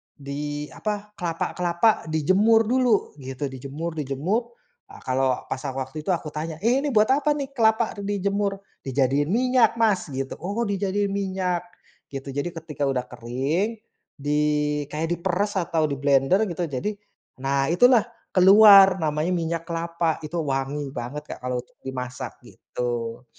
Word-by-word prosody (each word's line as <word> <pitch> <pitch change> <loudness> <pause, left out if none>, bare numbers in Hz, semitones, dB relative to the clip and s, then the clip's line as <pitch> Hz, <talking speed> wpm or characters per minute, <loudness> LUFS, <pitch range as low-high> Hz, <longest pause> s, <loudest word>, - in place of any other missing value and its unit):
di 145 +1 -5
apa, 210 -1 -4
kelapa-kelapa 175 +4 0
dijemur 190 +9 +4
dulu 250 -4 +2
gitu, 130 +2 -5
dijemur 140 +6 -5
dijemur, 155 - -2 0.4
a - - -12
kalau 130 0 +1
pas 130 - -3
waktu 135 +3 -5
itu - - -4
aku 165 -2 -3
tanya, 155 +1 -4
"Eh, 245 +3 +4
ini 295 - -1
buat 215 -1 +5
apa 295 +1 +2
nih 275 -1 -4
kelapa 220 -2 +2
dijemur?" 200 0 -1 0.3
"Dijadiin 135 +2 +1
minyak 250 +2 +3
Mas," 210 -6 +2
gitu, 135 0 -3
"Oh 200 +6 -2
dijadiin 200 0 -1
minyak," 190 -3 -1 0.5
gitu, 135 0 -6
jadi 145 +5 -2
ketika 155 -4 -4
udah 130 -2 0
kering 135 - -2 0.4
di 145 +1 0 0.5
kayak 160 +2 -2
diperes 190 +4 -1
atau 165 -2 0
diblender 140 +4 +2
gitu 175 -1 -3
jadi 145 +11 -3 0.4
nah 135 +1 0
itulah 245 +6 +5 0.3
keluar 195 0 +8
namanya 155 +1 0
minyak 165 -1 -2
kelapa, 170 -1 -1
itu 170 +3 -4
wangi 140 +1 -2
banget 140 +5 -5
Kak - - -17
kalau 125 -1 -1
untuk - - -32
dimasak 125 -1 -5
gitu. 120 0 -5
165 Hz, 140 wpm, -24 LUFS, 140-200 Hz, 0.5 s, keluar